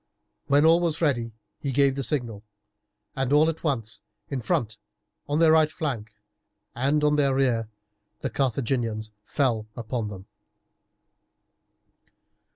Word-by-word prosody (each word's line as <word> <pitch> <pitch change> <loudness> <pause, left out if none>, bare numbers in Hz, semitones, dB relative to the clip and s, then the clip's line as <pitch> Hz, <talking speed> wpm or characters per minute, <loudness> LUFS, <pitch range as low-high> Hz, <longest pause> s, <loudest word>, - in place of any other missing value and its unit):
When 145 +2 +4
all 165 +1 +6
was 165 -2 0
ready 120 -8 +1 0.3
he 140 - -3
gave 140 +1 +3
the 140 - -2
signal, 120 -7 -3 0.7
and 135 -1 -1
at 155 +2 +3
once 115 -8 -2 0.3
in 135 -3 -3
front, 110 -1 -1 0.5
on 145 - +1
their 160 -1 +5
right 155 -1 +4
flank, 120 -10 -4 0.6
and 140 +5 +1
on 150 0 +3
their 140 -2 +3
rear 120 -5 +1 0.5
the - - -2
Carthaginians 115 -4 -1
fell 115 -3 0
upon 115 -1 -3
them. 95 -2 -8
135 Hz, 125 wpm, -26 LUFS, 115-150 Hz, 0.7 s, all